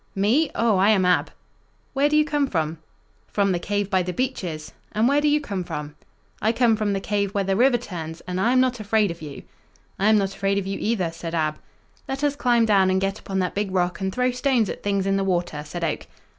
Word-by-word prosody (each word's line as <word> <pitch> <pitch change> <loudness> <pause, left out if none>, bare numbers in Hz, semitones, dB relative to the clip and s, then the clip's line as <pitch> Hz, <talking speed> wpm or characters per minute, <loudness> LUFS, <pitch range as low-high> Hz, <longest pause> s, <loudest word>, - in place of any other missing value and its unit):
"Me? 230 +11 +2
Oh, 230 -4 +2
I 195 +3 +4
am 195 -4 +4
Ab." 180 0 +2 0.6
"Where 280 +2 +2
do 300 - +3
you 305 - +4
come 295 -2 0
from?" 160 -6 -2 0.5
"From 200 -1 +1
the 175 - 0
cave 205 +2 -2
by 190 -1 +3
the 180 0 -3
beeches; 180 - -3 0.2
and 220 +2 +2
where 285 +2 +3
do 300 - +2
you 295 0 +3
come 200 -10 -4
from?" 150 -3 -6 0.5
"I 220 - +3
come 235 -2 +3
from 210 -2 -1
the 195 - -1
cave 200 +1 -2
where 200 - +2
the 195 0 0
river 245 +3 +4
turns, 165 -8 -7
and 185 0 -3
I 235 - +3
am 255 - +4
not 255 -2 +1
afraid 215 -2 +1
of 170 - -9
you." 150 -2 -8 0.6
"I 200 +2 +3
am 220 - +5
not 195 -1 0
afraid 195 0 0
of 200 - -1
you, 195 0 -3
either," 200 -7 0
said 165 0 -6
Ab. 155 -1 -1 0.5
"Let 270 +2 -4
us 290 -1 +1
climb 240 -4 +3
down 195 -3 +4
and 185 0 +2
get 195 +1 -2
upon 195 - -4
that 180 - -2
big 205 0 -1
rock 180 -1 0
and 190 0 -1
throw 250 +4 +1
stones 250 -4 +1
at - - -8
things 200 -1 0
in 195 0 +1
the 195 - 0
water," 175 -5 -1
said 170 +3 -6
Oak. 160 - -2
200 Hz, 245 wpm, -23 LUFS, 180-235 Hz, 0.6 s, am